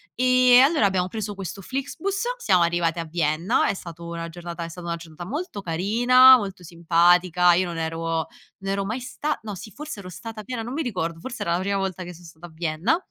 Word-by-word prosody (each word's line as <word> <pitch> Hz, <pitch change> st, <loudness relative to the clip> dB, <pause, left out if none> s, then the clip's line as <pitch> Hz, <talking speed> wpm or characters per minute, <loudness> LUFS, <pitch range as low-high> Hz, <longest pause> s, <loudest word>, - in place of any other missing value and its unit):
Ehm, 255 Hz, 0 st, +6 dB
allora 285 Hz, -7 st, +3 dB
abbiamo 185 Hz, -2 st, +1 dB
preso 205 Hz, 0 st, -5 dB
questo 195 Hz, 0 st, -6 dB
Flixbus, 300 Hz, -, -3 dB
siamo 185 Hz, -, +3 dB
arrivati 170 Hz, 0 st, 0 dB
a 165 Hz, -, -3 dB
Vienna, 165 Hz, +4 st, +1 dB
è -, -, +1 dB
stato 170 Hz, -3 st, -9 dB
una 170 Hz, 0 st, -5 dB
giornata 170 Hz, 0 st, -7 dB
è 165 Hz, -, -6 dB
stata 175 Hz, +1 st, -9 dB
una 170 Hz, -, -1 dB
giornata 165 Hz, +1 st, -10 dB
molto 290 Hz, -, -5 dB
carina, 240 Hz, +9 st, +6 dB
molto 195 Hz, -5 st, -6 dB
simpatica, 175 Hz, +1 st, +3 dB
io 185 Hz, +2 st, +2 dB
non 170 Hz, -2 st, -5 dB
ero 165 Hz, 0 st, -2 dB, 0.3 s
non 195 Hz, 0 st, -3 dB
ero 195 Hz, 0 st, -1 dB
mai 220 Hz, +5 st, -3 dB
sta 295 Hz, +4 st, -3 dB
no 210 Hz, -2 st, -5 dB
sì 200 Hz, +4 st, -10 dB
forse 300 Hz, -2 st, -8 dB
ero 185 Hz, -2 st, -9 dB
stata 215 Hz, +5 st, -8 dB
a -, -, -13 dB
Vienna, 250 Hz, -3 st, -4 dB
non 245 Hz, +3 st, -6 dB
mi 320 Hz, -, -1 dB
ricordo, 170 Hz, -, -3 dB
forse 260 Hz, +6 st, -7 dB
era 170 Hz, -, 0 dB
la 175 Hz, -, +1 dB
prima 200 Hz, +1 st, -1 dB
volta 190 Hz, -1 st, -3 dB
che 175 Hz, 0 st, -8 dB
so 175 Hz, +1 st, -15 dB
stato 165 Hz, +1 st, -13 dB
a 170 Hz, -, -12 dB
Vienna 165 Hz, -, 0 dB
185 Hz, 225 wpm, -24 LUFS, 170-230 Hz, 0.3 s, Ehm